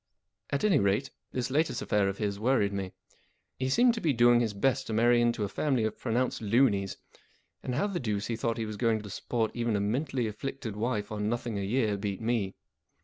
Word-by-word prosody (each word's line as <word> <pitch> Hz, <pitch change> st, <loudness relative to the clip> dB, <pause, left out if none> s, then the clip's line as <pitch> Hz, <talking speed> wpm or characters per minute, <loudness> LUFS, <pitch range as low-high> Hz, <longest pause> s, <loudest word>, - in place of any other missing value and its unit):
At 140 Hz, -, -1 dB
any 195 Hz, -9 st, +4 dB
rate, 100 Hz, +7 st, +1 dB, 0.2 s
this 125 Hz, 0 st, -2 dB
latest 155 Hz, +4 st, +1 dB
affair 105 Hz, -1 st, +2 dB
of 100 Hz, -, -4 dB
his 100 Hz, -2 st, -2 dB
worried 110 Hz, -4 st, +2 dB
me. 95 Hz, -2 st, -3 dB, 0.7 s
He 130 Hz, 0 st, 0 dB
seemed 240 Hz, -, +4 dB
to 225 Hz, -, -4 dB
be 155 Hz, -4 st, +2 dB
doing 120 Hz, 0 st, +5 dB
his 110 Hz, -4 st, -1 dB
best 130 Hz, +5 st, +1 dB
to 110 Hz, -, -3 dB
marry 120 Hz, +2 st, +4 dB
into 120 Hz, -2 st, +1 dB
a -, -, 0 dB
family 130 Hz, +3 st, 0 dB
of 110 Hz, -1 st, -2 dB
pronounced 125 Hz, +1 st, -1 dB
loonies, 105 Hz, -3 st, +2 dB, 0.6 s
and 125 Hz, -, -3 dB
how 145 Hz, -, +1 dB
the 195 Hz, -4 st, -2 dB
deuce 105 Hz, -5 st, -2 dB
he 115 Hz, -, -2 dB
thought 115 Hz, 0 st, -1 dB
he 115 Hz, -, -2 dB
was 105 Hz, -1 st, -6 dB
going 115 Hz, -2 st, +2 dB
to 105 Hz, -, -8 dB
support 115 Hz, +2 st, -1 dB
even 115 Hz, -2 st, 0 dB
a -, -, +1 dB
mentally 125 Hz, +5 st, -1 dB
afflicted 110 Hz, +1 st, -5 dB
wife 105 Hz, -1 st, -2 dB
on 105 Hz, 0 st, -1 dB
nothing 120 Hz, -2 st, -2 dB
a -, -, -2 dB
year 105 Hz, 0 st, +1 dB
beat 100 Hz, -1 st, -3 dB
me. 110 Hz, -4 st, -1 dB
115 Hz, 215 wpm, -29 LUFS, 105-130 Hz, 0.7 s, doing